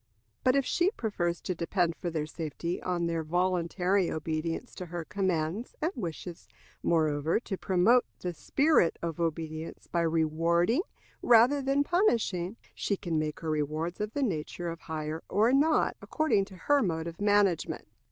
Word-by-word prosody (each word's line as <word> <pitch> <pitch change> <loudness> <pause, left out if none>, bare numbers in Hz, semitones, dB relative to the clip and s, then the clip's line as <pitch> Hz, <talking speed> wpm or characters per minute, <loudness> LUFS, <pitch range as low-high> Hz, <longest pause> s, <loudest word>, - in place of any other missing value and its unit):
But 255 +1 +4
if 275 -2 +2
she 350 +2 +2
prefers 185 - -2
to 185 - -2
depend 170 0 0
for 175 - -4
their 155 -2 -2
safety 165 +2 -4
on 175 -2 -1
their 165 -1 -1
voluntary 180 +2 +1
obedience 160 +7 -3
to 180 - -7
her 170 -1 -5
commands, 185 +2 -1
and 320 +3 0
wishes, 175 -4 -6 0.3
moreover, 155 0 +2
to 200 - -4
promote 190 +7 +3
the 180 -1 -4
spirit 270 - +2
of 165 -2 -3
obedience 160 -1 -3
by 170 - -1
rewarding 165 - +2 0.4
rather 245 +5 +5
than 275 +1 +2
punishing, 230 - +1 0.2
she 200 - -1
can 170 -4 -1
make 155 -1 -3
her 160 -1 -2
rewards 155 +4 -2
of 210 +1 -3
the 285 - 0
nature 175 - -2
of 165 - -8
hire 155 0 -4
or 220 +6 +3
not, 305 +3 +3
according 310 -11 +1
to 195 - -13
her 285 +9 +2
mode 165 -5 -1
of 170 +2 -7
management. 205 -4 +2
175 Hz, 160 wpm, -29 LUFS, 165-210 Hz, 0.4 s, rather